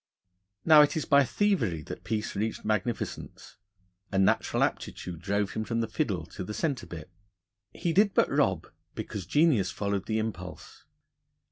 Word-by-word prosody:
Now, 155 -2 +9
it 150 +1 +3
is 155 - -1
by 140 0 +5
thievery 125 - 0
that - - -8
Peace 110 -2 -3
reached 110 +3 -3
magnificence. 110 +2 -3 0.5
A 95 - -1
natural 95 0 +2
aptitude 85 -2 -3
drove 100 +1 0
him 110 - -3
from 115 +1 -1
the 115 - -1
fiddle 105 - -2
to 95 - -7
the 105 +3 -6
centre 140 -8 -2
bit. 85 +1 -9 0.6
He 170 - -2
did 200 +2 +3
but - - +4
rob, - - +1 0.3
because 95 -5 -5
genius 145 - +3
followed 100 -1 -2
the 110 - 0
impulse. 105 -5 -6
110 Hz, 155 wpm, -28 LUFS, 95-140 Hz, 0.6 s, Now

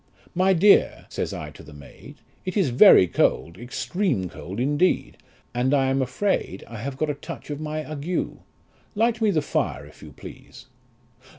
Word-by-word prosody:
My 185 +2 +3
dear, 195 +4 +4
says - - -3
I - - -6
to - - -14
the 75 0 -13
maid, 75 -1 -13 0.3
it 185 +2 -4
is 190 -9 +2
very 125 - +8
cold, 85 0 0
extreme 125 - -2
cold 95 +6 -8
indeed, 145 +8 +1 0.4
and 125 +3 +1
I 135 -1 +2
am 135 0 +1
afraid 130 - -1
I 115 - -9
have 130 +4 -5
got 155 +1 0
a - - -3
touch 145 - -9
of 145 +1 -5
my 155 0 -4
ague; 155 +4 -3 0.6
light 230 +2 +1
me 220 - +3
the 160 -6 +1
fire, - - -2
if - - -17
you - - -11
please. - - -13
145 Hz, 175 wpm, -24 LUFS, 125-185 Hz, 0.6 s, very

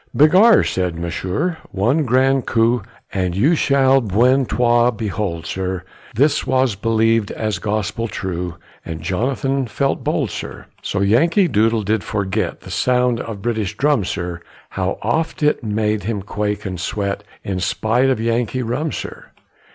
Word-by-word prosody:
Begar, 185 +10 +6
said 90 -3 -1
Monsieur, 95 - -2
one 120 +11 +1
grand 130 +2 +2
coup 115 0 +2 0.3
You 95 - +2
shall 135 -3 +3
bientôt 120 +2 +2
behold, 95 -6 -3
sir; 95 +1 -3 0.3
This 140 +6 +2
was 130 -3 +2
believ'd 115 +1 +1
as 110 -5 -2
gospel 110 +3 -2
true, 90 -4 -4 0.3
And 80 -1 -7
Jonathan 130 - -1
felt 135 +5 -1
bold, - - 0
sir. - - -7 0.2
So 100 - -2
Yankee 165 - +3
Doodle 110 -3 +2
did 105 -1 0
forget 100 -2 -2
The - - -10
sound 125 -1 +1
of 105 -4 -6
British 110 -3 -2
drum, 145 -6 +2
sir, 85 -1 -4 0.3
How 95 0 -2
oft 155 +8 -1
it 150 -3 +2
made 105 -1 0
him 105 -3 -2
quake 105 0 -3
and 95 -2 -4
sweat, 100 +2 -2 0.2
In 95 -2 -3
spite 115 +8 +1
of 130 - +1
Yankee 115 +2 0
rum, 130 +7 -2
sir. - - -7
110 Hz, 145 wpm, -19 LUFS, 100-130 Hz, 0.3 s, Begar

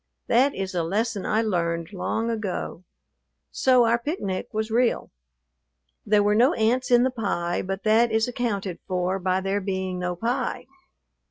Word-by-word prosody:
That 265 +4 +3
is 190 0 -4
a 175 - 0
lesson 205 +4 -1
I 220 +1 +2
learned 170 -3 -1
long 225 +4 -1
ago; 205 -5 -4 0.7
so 255 -2 +4
our 230 +1 +2
picnic 235 - -3
was 220 +1 -2
real. 240 +1 +1 1.0
There 205 0 +4
were 205 0 +3
no 240 +5 +4
ants 240 +4 +1
in 245 -1 +5
the 260 - +1
pie, 190 -7 -2
but 195 +1 -4
that 225 +2 +4
is 220 +1 +2
accounted 205 -7 -3
for 185 0 -1
by 185 0 0
there 195 +1 -1
being 190 -1 -3
no 180 0 -2
pie. 235 +7 -2
210 Hz, 160 wpm, -25 LUFS, 185-235 Hz, 1.0 s, in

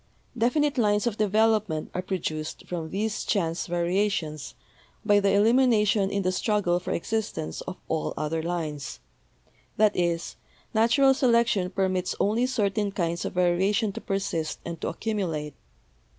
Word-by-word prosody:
Definite 270 +4 +1
lines 210 -1 +2
of 225 -3 -2
development 215 -5 +1
are 180 - -2
produced 160 -5 -4
from 165 -3 -4
these 215 +4 -2
chance 165 -4 -1
va 175 0 -1
riations 175 -5 -1 0.5
by 205 -1 +5
the 200 -1 +2
elimination 210 -1 +3
in 200 0 -1
the 185 - +1
struggle 185 -3 +1
for 180 - -7
existence 205 - -3
of - - -5
all 75 - -2
other 160 +1 -1
lines; 155 - -4 0.8
that 215 -1 +4
is, 170 -1 -1 0.4
natural 235 +5 +4
selection 235 -7 +2
permits 185 -1 -1
only 225 +5 +2
certain 210 -4 0
kinds 170 -2 -2
of - - -4
variation 190 +5 +2
to - - -7
persist 180 -5 -2
and 170 -1 -6
to - - -2
accumulate. 170 - -3
195 Hz, 140 wpm, -26 LUFS, 170-215 Hz, 0.8 s, by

